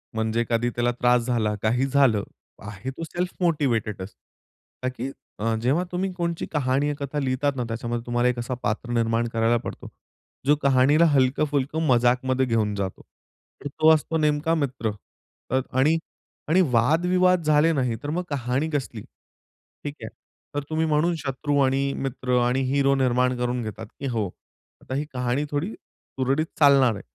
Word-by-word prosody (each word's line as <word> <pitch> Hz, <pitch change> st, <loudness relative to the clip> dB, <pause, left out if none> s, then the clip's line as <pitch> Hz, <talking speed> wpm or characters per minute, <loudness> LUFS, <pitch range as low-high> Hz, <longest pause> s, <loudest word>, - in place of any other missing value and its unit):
म्हणजे 110 Hz, +1 st, 0 dB
कधी 120 Hz, +1 st, +1 dB
त्याला 120 Hz, 0 st, +1 dB
त्रास 120 Hz, 0 st, +2 dB
झाला 110 Hz, -4 st, 0 dB
काही 120 Hz, +4 st, +1 dB
झालं, 130 Hz, -7 st, +3 dB, 0.4 s
आहे 105 Hz, +4 st, -6 dB
तो 135 Hz, -, -8 dB
सेल्फ 175 Hz, +3 st, -3 dB
मोटिवेटेडचं. 120 Hz, -, 0 dB, 0.8 s
का 130 Hz, -, +1 dB
की 130 Hz, +3 st, -3 dB, 0.3 s
अ, 115 Hz, +1 st, 0 dB
जेव्हा 140 Hz, +9 st, +2 dB
तुम्ही 185 Hz, +1 st, -1 dB
कोणची 170 Hz, -2 st, -2 dB
कहाणी 140 Hz, -1 st, +1 dB
या 145 Hz, -, -1 dB
कथा 140 Hz, +1 st, -4 dB
लिहितात 135 Hz, +1 st, 0 dB
ना 125 Hz, -, -2 dB
त्याच्यामध्ये 120 Hz, +1 st, -4 dB
तुम्हाला 120 Hz, 0 st, +1 dB
एक 125 Hz, -1 st, -2 dB
असा 120 Hz, +2 st, -3 dB
पात्र 110 Hz, +3 st, -2 dB
निर्माण 115 Hz, 0 st, +1 dB
करायला 115 Hz, +1 st, +2 dB
पडतो, 115 Hz, -, -7 dB, 0.6 s
जो 145 Hz, +2 st, +5 dB
कहाणीला 140 Hz, +4 st, +5 dB
हलकं-फुलकं 140 Hz, +3 st, +1 dB
मजाकमध्ये 125 Hz, +2 st, +2 dB
घेऊन 110 Hz, -4 st, 0 dB
जातो. 95 Hz, -2 st, -4 dB, 0.6 s
आणि 145 Hz, -, -3 dB
तो 155 Hz, -, +7 dB
असतो 160 Hz, +1 st, 0 dB
नेमका 150 Hz, +1 st, +1 dB
मित्र 130 Hz, -7 st, -1 dB, 0.6 s
अ, 130 Hz, -, +2 dB
आणि, 145 Hz, +6 st, +3 dB, 0.5 s
आणि, 185 Hz, +3 st, +5 dB
वादविवाद 175 Hz, +8 st, +3 dB
झाले 150 Hz, +2 st, +4 dB
नाही 125 Hz, -5 st, 0 dB
तर, 145 Hz, -, -3 dB
मग 175 Hz, +4 st, -1 dB
कहाणी 135 Hz, +2 st, -1 dB
कसली? 135 Hz, -7 st, -3 dB, 0.8 s
ठीक 145 Hz, 0 st, -5 dB
आहे. -, -, -5 dB, 0.5 s
तर, 145 Hz, -, -1 dB
तुम्ही 160 Hz, +1 st, 0 dB
म्हणून 160 Hz, +3 st, +2 dB
शत्रू 145 Hz, +1 st, -2 dB
आणि 135 Hz, +1 st, +1 dB
मित्र 130 Hz, -2 st, -1 dB
आणि 130 Hz, +2 st, +1 dB
हिरो 140 Hz, 0 st, +3 dB
निर्माण 125 Hz, -1 st, +2 dB
करून 125 Hz, 0 st, -1 dB
घेतात 110 Hz, 0 st, -6 dB
की 140 Hz, -, -3 dB
हो, 115 Hz, -5 st, -1 dB, 0.5 s
आता 130 Hz, -, -5 dB
ही 145 Hz, +2 st, -1 dB
कहाणी 125 Hz, +3 st, -1 dB
थोडी 150 Hz, +8 st, -1 dB
सुरळीत 135 Hz, +4 st, -3 dB
चालणार 140 Hz, -5 st, +6 dB
आहे. 100 Hz, -, -7 dB
130 Hz, 160 wpm, -24 LUFS, 120-150 Hz, 0.8 s, तो